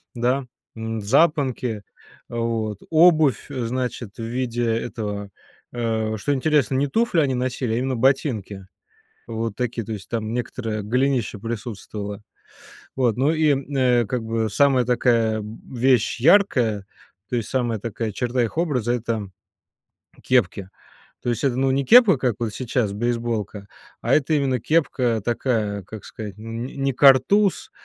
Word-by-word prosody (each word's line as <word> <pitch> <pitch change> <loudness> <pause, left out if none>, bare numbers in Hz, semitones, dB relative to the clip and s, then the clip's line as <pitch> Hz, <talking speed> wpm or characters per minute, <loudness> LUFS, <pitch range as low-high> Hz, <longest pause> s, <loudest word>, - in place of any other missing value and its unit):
да, 125 +3 0 0.3
м, 110 -1 -4
запонки, 130 -3 +1 0.5
вот, 115 -3 -2
обувь, 160 -4 +4
э, 125 -4 -3
значит, 125 -3 -4
в 115 - -6
виде 120 0 -2
этого 105 -3 -3 0.5
Э, 110 -2 -1
что 145 +7 -1
интересно: 140 -3 +1
не 135 +2 +2
туфли 225 +2 +1
они 135 -3 +1
носили, 125 -2 -2
а - - 0
именно 130 +1 -1
ботинки 110 -7 0 0.6
вот 115 -2 -3
такие, 120 -2 -3
то 110 - -7
есть 100 -1 -8
там 110 -1 -3
некоторое 115 -3 -3
голенище 125 0 0
присутствовало. 105 -2 -6 0.7
Вот, 120 -5 +1
ну 140 +5 +2
и, 155 -3 +3 0.2
э, 125 -2 +3
как 125 0 -2
бы 110 -1 -1
самая 135 +1 +3
такая 115 -3 +2 0.3
вещь 125 -2 +2
яркая, 125 - +3 0.5
то 125 - 0
есть 115 - -3
самая 120 -4 -1
такая 115 0 -3
черта 125 +2 -1
их 115 +8 -3
образа- 130 -9 0
это 110 -4 -3 0.9
кепки, 100 -6 +1 0.6
то 120 - -1
есть 120 - -2
это 125 -3 +1
не 135 +1 +1
кепка, 225 - +7
как 125 -4 0
вот 115 -3 -2
сейчас, 125 -3 -1
бейсболка, 115 -3 -2 0.3
а - - +1
это 155 +1 +1
именно 135 -4 +1
кепка, 125 -6 +1
такая, 110 -4 -1
как 110 +3 -10
сказать, 105 -3 -8
н 115 +2 -5
н 135 +1 -6
не 135 - +2
картуз, 145 +10 +4
120 Hz, 145 wpm, -23 LUFS, 110-130 Hz, 0.9 s, кепка